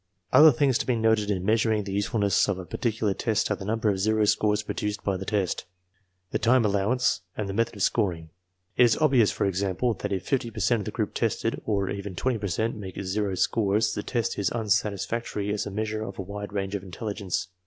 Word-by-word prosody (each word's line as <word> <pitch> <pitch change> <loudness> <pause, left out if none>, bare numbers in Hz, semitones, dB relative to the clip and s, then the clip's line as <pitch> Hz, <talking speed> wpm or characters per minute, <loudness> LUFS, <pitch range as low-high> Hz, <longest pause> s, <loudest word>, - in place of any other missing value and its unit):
Other 155 +1 +9
things 135 -1 +2
to - - -3
be 125 - +2
noted 110 -2 +2
in 95 -3 -1
measuring 110 0 +2
the 100 - -6
usefulness 100 0 +2
of 100 - 0
a 95 - -7
particular 110 -1 -1
test 110 +1 0
are - - +2
the 95 - -8
number 110 +1 -1
of 100 -2 +1
zero 110 +2 +2
scores 105 0 +2
produced 105 0 -3
by 100 - 0
the 95 +1 -6
p^y 100 -4 -1 0.7
the - - 0
time 120 0 +4
allowance, 105 +2 +1 0.2
and 105 - -2
the 95 - -4
method 115 +2 0
of 100 - -2
scoring. 85 -8 0 0.5
It 125 - +7
is 115 - +3
ob 155 -3 +3
vious, 120 -6 +4
for - - -1
example, 100 +5 0
that 105 0 -5
if 95 -1 -2
fifty 125 -4 0
per 110 - -8
cent 115 +4 +2
of - - -7
the - - -4
group - - -2
tested, - - -1
or 100 -3 +1
I - - -2
even 100 -1 -6
twenty 125 +3 0
per 100 - -3
cent, 110 +5 -1
make 95 -3 -7
zero 100 0 -1
scores, 105 +2 +1
the - - -3
test 115 0 -2
is 100 - +1
unsatisfactory 105 -1 -1
\as 105 - -2
a - - -3
measure 110 +1 -3
of 100 -3 -6
a 95 - -4
wide 100 +2 -6
range 100 -1 -3
of 100 - -2
intelligence. 95 0 -4
105 Hz, 230 wpm, -26 LUFS, 100-110 Hz, 0.7 s, Other